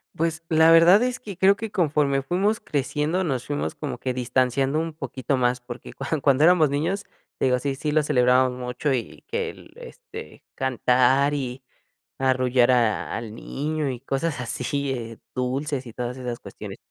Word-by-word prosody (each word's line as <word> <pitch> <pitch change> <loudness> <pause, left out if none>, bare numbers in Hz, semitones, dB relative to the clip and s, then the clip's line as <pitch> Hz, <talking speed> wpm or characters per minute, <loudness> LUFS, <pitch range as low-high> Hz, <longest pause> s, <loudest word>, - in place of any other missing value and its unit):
Pues 165 0 -1
la 160 0 +5
verdad 170 +6 +7
es 250 0 -1
que 200 -7 -8
creo 195 +1 +5
que 215 0 -6
conforme 145 -5 +1
fuimos 195 +9 0
creciendo 150 - -1
nos 130 -7 -2
fuimos 75 +2 -2
como - - -5
que 130 - -3
distanciando 130 +3 +1
un 165 -1 -3
poquito 135 -3 -3
más 125 0 +1
porque 125 0 -9
cuan 140 +1 -3
cuando 140 +1 +3
éramos 170 -3 +5
niños, 165 +8 -1 0.4
te - - +1
digo 125 -1 +3
sí 140 +1 -2
sí 150 +3 -3
lo 155 0 +3
celebrábamos 125 -2 +3
mucho 125 +3 -1
y 120 -3 -4
que 465 +2 -2
el - - -13
este 475 -2 -11
cantar 130 +2 +2
y 130 -2 -4 0.6
arrullar 130 -2 +3
a 115 -4 +1
al 110 -2 -7
niño 150 +3 -3
y 125 -2 -5
cosas 135 +2 -2
así, 125 -1 -3 0.2
dulces 130 +1 -2
y 115 - -10
todas 125 0 -4
esas 125 -2 -5
cuestiones. - - -9
135 Hz, 170 wpm, -24 LUFS, 125-160 Hz, 0.6 s, verdad